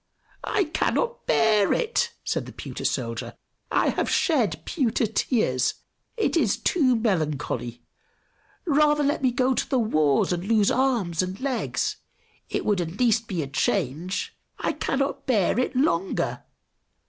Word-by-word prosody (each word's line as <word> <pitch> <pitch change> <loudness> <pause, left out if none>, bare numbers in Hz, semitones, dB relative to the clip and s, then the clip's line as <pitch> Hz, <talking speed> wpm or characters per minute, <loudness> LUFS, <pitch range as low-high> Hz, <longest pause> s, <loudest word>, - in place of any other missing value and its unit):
"I 420 - +2
cannot 465 +8 -1
bear 215 -3 +3
it!" 475 0 0
said - - -2
the - - -8
pewter - - -7
soldier. - - -2 0.4
"I - - +3
have - - -1
shed 215 - +1
pewter 245 -6 0
tears! 200 - 0 0.4
It 440 - +1
is 245 -12 +2
too 270 -8 +2
melancholy! 155 - -2 0.8
Rather 295 -1 +3
let 290 +2 0
me 260 - +3
go 255 +2 +1
to - - -2
the 270 - +2
wars 155 - +2
and 175 0 -3
lose 210 0 +3
arms 235 -11 +1
and 185 +1 -4
legs! 265 -2 -1 0.5
It - - -2
would 205 -4 +2
at 170 +2 -5
least 230 -2 +2
be 175 -6 -2
a - - -5
change. 150 +6 -1 0.2
I - - -1
cannot 275 +1 -2
bear 220 -2 +2
it 255 - -1
longer! 195 - 0
225 Hz, 145 wpm, -25 LUFS, 175-270 Hz, 0.8 s, bear